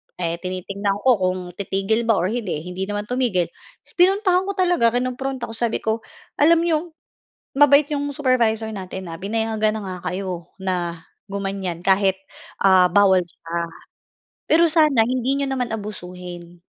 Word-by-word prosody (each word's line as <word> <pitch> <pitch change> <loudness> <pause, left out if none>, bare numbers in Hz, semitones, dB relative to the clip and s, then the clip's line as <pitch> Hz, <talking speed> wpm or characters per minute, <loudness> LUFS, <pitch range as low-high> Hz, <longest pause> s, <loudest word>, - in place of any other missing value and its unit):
eh, 170 -1 -3
tinitignan 195 +2 -3
ko 255 -5 +4
kung 185 0 0 0.2
titigil 200 +4 -1
ba 225 - +4
or 185 +1 0
hindi, 210 -10 -3
hindi 180 +2 -5
naman 205 0 -3
tumigil. 240 -9 0 0.5
Pinuntahan 375 0 +3
ko 400 - -1
talaga 350 - +2
kinumpronta 255 0 -2
ko - - -8
sabi 235 -1 -1
ko, 220 +1 0 0.4
“Alam 330 +3 +5
niyo, 335 -2 +2 0.8
mabait 290 0 +6
'yong 285 -1 -2
supervisor 230 -5 +1
natin, 190 -2 -7
ah. 165 - -7
Pinayagan 220 +1 0
na - - -5
nga 185 -1 -5 0.2
kayo 180 -3 -4
na 180 -3 -2 0.3
gumanyan 195 -3 -4
kahit, 190 0 +3 0.5
ah, 190 -2 +6
bawal 190 0 +5
siya. 170 0 -7 0.9
Pero 335 +2 +5
sana 305 -8 +4
hindi 255 +2 0
niyo 280 - 0
naman 255 -3 -2
abusuhin 180 -5 -7
210 Hz, 145 wpm, -22 LUFS, 185-255 Hz, 0.9 s, mabait